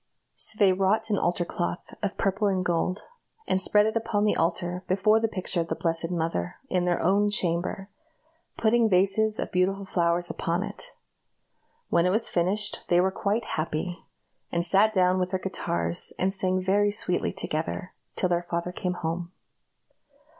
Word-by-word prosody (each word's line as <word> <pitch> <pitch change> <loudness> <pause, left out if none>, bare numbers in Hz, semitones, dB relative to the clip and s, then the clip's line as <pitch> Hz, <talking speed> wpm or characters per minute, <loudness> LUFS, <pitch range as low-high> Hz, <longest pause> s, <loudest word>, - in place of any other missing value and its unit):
So 215 - -1
they 195 -3 +5
wrought 210 +4 +1
an 205 - +2
altar 175 0 0
cloth 85 - -4
of 205 -1 -2
purple 200 +2 +1
and 185 -2 0
gold, 180 +3 0 0.4
and 190 - +1
spread 210 +2 +4
it 220 - -1
upon 225 -2 0
the 210 - +2
altar, 175 +2 -1
before 200 +4 +3
the 225 - +1
picture 185 -4 -1
of 165 - -4
the - - -2
Blessed 165 -1 -1
Mother, 160 - -2 0.2
in 180 -1 +1
their 175 -1 +1
own 200 +4 +3
chamber; 185 0 -1 0.7
putting 230 0 +3
vases 200 +3 +2
of - - -4
beautiful 195 +2 +1
flowers 175 -1 +1
upon 170 +3 -2
it. 215 - -7 1.0
When 170 +1 +3
it - - +3
was 220 +5 0
finished 200 +4 -1
they 175 - +4
were 190 +1 +3
quite 210 +4 -1
happy, 160 +3 -3 0.5
and 170 0 0
sat 195 +4 +4
down 185 -2 +3
with 180 0 0
their 190 0 -1
guitars, 85 - 0
and 190 +1 +1
sang 185 -1 +1
very 205 +2 +3
sweetly 195 -3 -1
together, 180 0 -4 0.2
till 185 - +1
their 175 -1 +1
father 175 0 -3
came 180 0 -2
home. 170 0 -4
185 Hz, 170 wpm, -27 LUFS, 175-205 Hz, 1.0 s, they